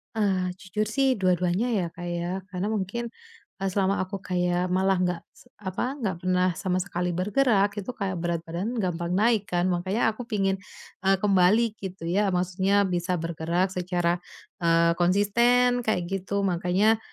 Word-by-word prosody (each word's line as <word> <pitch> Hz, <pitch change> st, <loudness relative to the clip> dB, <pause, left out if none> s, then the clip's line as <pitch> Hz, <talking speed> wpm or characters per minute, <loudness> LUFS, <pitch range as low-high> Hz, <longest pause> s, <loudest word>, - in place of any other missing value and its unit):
Eee, 190 Hz, -4 st, +1 dB
jujur 200 Hz, +3 st, -2 dB
sih 270 Hz, +4 st, +2 dB
dua-duanya 185 Hz, +1 st, +1 dB
ya 180 Hz, -, 0 dB
Kak 175 Hz, -, -8 dB
ya 175 Hz, 0 st, -3 dB, 0.2 s
karena 185 Hz, +2 st, -2 dB
mungkin, 220 Hz, +2 st, -2 dB, 0.5 s
eee, 195 Hz, 0 st, 0 dB
selama 195 Hz, 0 st, +1 dB
aku 190 Hz, +1 st, -6 dB
kayak 180 Hz, -1 st, 0 dB
malah 190 Hz, +1 st, +2 dB
nggak 180 Hz, -2 st, 0 dB
se -, -, -21 dB
apa 205 Hz, +7 st, -3 dB
nggak 200 Hz, -8 st, -1 dB
pernah 180 Hz, 0 st, +2 dB, 0.2 s
sama 185 Hz, -1 st, 0 dB
sekali 180 Hz, -2 st, -2 dB
bergerak 205 Hz, +1 st, +2 dB
itu 205 Hz, +5 st, -5 dB
kayak 190 Hz, -4 st, -3 dB
berat 170 Hz, 0 st, -1 dB
badan 180 Hz, +9 st, -4 dB
gampang 180 Hz, -4 st, -1 dB
naik 215 Hz, 0 st, +2 dB
kan 175 Hz, 0 st, 0 dB
makanya 190 Hz, +6 st, +1 dB
aku 235 Hz, +2 st, -8 dB
pengen, 195 Hz, -3 st, 0 dB, 0.5 s
eee, 195 Hz, -, +6 dB
kembali 200 Hz, +2 st, +4 dB, 0.2 s
gitu 190 Hz, -3 st, -7 dB
ya 205 Hz, 0 st, +3 dB
maksudnya 190 Hz, +3 st, +2 dB
bisa 180 Hz, -1 st, -1 dB
bergerak 170 Hz, +2 st, -1 dB
secara, 175 Hz, -1 st, 0 dB, 0.4 s
eee, 170 Hz, -1 st, +4 dB
konsisten 235 Hz, +7 st, +3 dB
kayak 220 Hz, -6 st, 0 dB
gitu 195 Hz, +1 st, -1 dB
makanya 190 Hz, +4 st, +2 dB
190 Hz, 160 wpm, -26 LUFS, 180-205 Hz, 0.5 s, eee